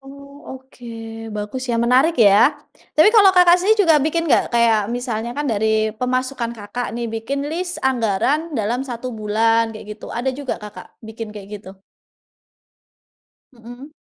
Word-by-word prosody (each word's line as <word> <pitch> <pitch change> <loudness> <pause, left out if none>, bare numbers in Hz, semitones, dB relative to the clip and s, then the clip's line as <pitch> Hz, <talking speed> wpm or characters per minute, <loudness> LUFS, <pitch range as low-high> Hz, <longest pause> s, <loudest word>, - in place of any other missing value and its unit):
Oh, 280 0 -12
oke, 260 -1 -19 0.5
bagus 210 +5 -5
ya 235 - 0
menarik 260 +7 +3
ya. 225 +6 +5 0.4
Tapi 310 +6 +7
kalau 420 -4 +7
Kakak 355 -1 +7
sendiri 415 +2 +3
juga 325 -3 +5
bikin 315 +3 -1
nggak - - +3
kayak 235 -2 +3 0.2
misalnya 235 -2 -4
kan 295 - -2
dari 220 0 0
pemasukan 255 -1 -2
Kakak 210 +4 -5
nih 240 - -3
bikin 275 +6 -3
list 355 +2 -3
anggaran 250 +2 +1 0.2
dalam 225 +4 -1
1 255 -1 -6
bulan 225 +1 0
kayak 215 - -11
gitu - - -11
ada 245 +3 -2
juga 275 0 -5
Kakak 210 -1 -11 0.2
bikin 220 0 -8
kayak 200 -1 -10
gitu? 190 -1 -14 1.7
Mhm. 245 +4 -12
245 Hz, 150 wpm, -20 LUFS, 220-280 Hz, 1.7 s, Tapi